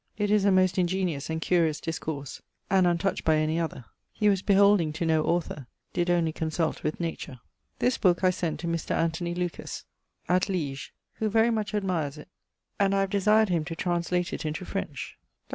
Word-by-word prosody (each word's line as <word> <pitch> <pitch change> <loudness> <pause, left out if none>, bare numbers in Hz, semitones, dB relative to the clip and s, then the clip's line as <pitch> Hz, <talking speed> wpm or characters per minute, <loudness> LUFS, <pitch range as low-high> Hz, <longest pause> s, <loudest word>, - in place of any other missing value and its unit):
It 205 -1 0
is 210 -2 +3
a 200 - +5
most 185 -1 +3
ingeniose 180 -5 0
and 160 0 -2
curious 165 -3 +1
discourse, 155 -4 -5 0.3
and 190 -2 +4
untouched 175 +2 0
by 160 - +3
any 155 +1 +1
other; 160 -7 -4 0.3
he 210 - +2
was 195 -2 +2
beholding 200 -5 +4
to 165 +2 -2
no 160 -1 +2
author; 160 -6 -1 0.3
did 175 0 0
only 170 -2 +2
consult 160 0 -2
with 155 - -2
nature. 165 -6 -5 0.4
This 250 -1 +1
booke 180 -1 +3
I 185 - +5
sent 175 -3 -3
to 170 - -4
Mr. 170 -1 -1
Anthony 170 +1 -1
Lucas, 175 -1 -4 0.4
at 185 +3 +2
Liege, 145 -7 -3 0.3
who 220 - +1
very 225 +2 +3
much 215 -1 -2
admires 170 -8 -1
it 150 - -12 0.5
and 195 -1 +3
I 195 - +3
have 195 -1 -1
desired 210 +2 +4
him 170 -3 +1
to 165 0 -5
translate 175 +1 -1
it - - -4
into 155 +4 -4
French. 150 -9 -5 0.2
Dr. - - -45
175 Hz, 195 wpm, -27 LUFS, 160-195 Hz, 0.5 s, a